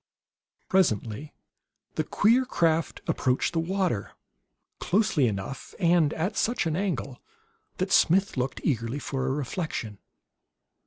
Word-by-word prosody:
Presently 140 - 0 0.6
the 155 - 0
queer 230 - +3
craft 165 -10 0
approached 130 +4 +1
the 165 - +1
water 180 - -1 0.7
closely 190 - +2
enough, 105 +5 -5
and 170 -4 +4
at 180 +7 -1
such 235 -3 0
an 160 -1 0
angle, 155 -9 -3 0.6
that 185 +1 -2
Smith 190 +4 +4
looked 130 0 -2
eagerly 115 -2 -1
for 135 -2 -3
a - - +1
reflection. 135 - -3
155 Hz, 115 wpm, -27 LUFS, 130-185 Hz, 0.7 s, and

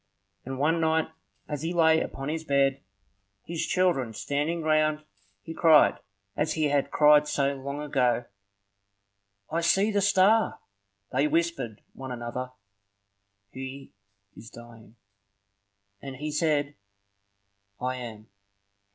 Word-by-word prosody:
And 135 +1 -5
one 160 +4 +1
night 160 0 +1 0.4
as 150 -2 -4
he 165 +2 -3
lay 160 -1 +4
upon 135 0 -5
his 160 +1 -3
bed, 140 -2 +1 0.6
his 170 -1 -4
children 170 -11 +1
standing 150 +8 -2
round, 155 0 +1 0.4
he 165 - -7
cried, 160 -2 +5 0.4
as 150 - 0
he 155 -2 0
had 140 -1 +1
cried 150 0 +5
so 140 -1 0
long 140 +1 -6
ago,— 125 -4 +1 1.3
"I 165 +2 0
see 195 +5 +3
the 205 -1 +1
star!" 200 +3 +3 0.5
They 135 +4 +2
whispered 165 -8 -2
one 130 -1 -8
another, 125 +1 -5 1.0
"He 135 +1 -8 0.4
is 115 - -12
dying." 115 -1 -14 1.1
And 135 -1 -7
he 150 +3 -5
said, 150 -2 0 1.1
"I 130 0 -2
am. 110 -3 -9
150 Hz, 120 wpm, -27 LUFS, 130-160 Hz, 1.3 s, cried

